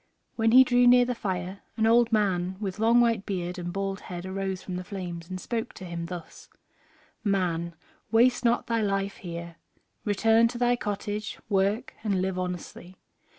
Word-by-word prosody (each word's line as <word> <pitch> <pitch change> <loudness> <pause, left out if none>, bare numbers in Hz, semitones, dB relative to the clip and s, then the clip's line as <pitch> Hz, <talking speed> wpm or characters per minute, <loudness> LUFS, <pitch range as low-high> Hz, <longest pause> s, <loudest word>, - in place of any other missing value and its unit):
When 225 -1 +2
he 260 +2 +9
drew 245 -1 +4
near 245 0 +7
the 250 - -1
fire 190 -3 -4 0.2
an 220 - +2
old 235 +1 +4
man 190 -4 +1
with 200 -2 -4
long 230 +2 +5
white 230 -4 +2
beard 180 -2 -3
and 175 0 -4
bald 195 +1 -3
head 175 0 -7
arose 190 0 -3
from 185 - -5
the 180 - -5
flames 175 -3 -6
and 185 0 -5
spoke 225 +3 -3
to 185 - -9
him 170 -1 -5
thus: 175 -2 -9 0.7
"Man, 175 -5 0 0.4
waste 245 +2 +4
not 235 0 +2
thy 230 -1 0
life 195 -1 -1
here; 170 -1 -7 0.5
return 225 +2 +4
to 240 +1 -6
thy 245 0 +3
cottage, 210 -1 -4
work, 200 +4 +1
and 200 -4 +1
live 185 0 -1
honestly. 180 0 -6
195 Hz, 175 wpm, -27 LUFS, 180-225 Hz, 0.7 s, he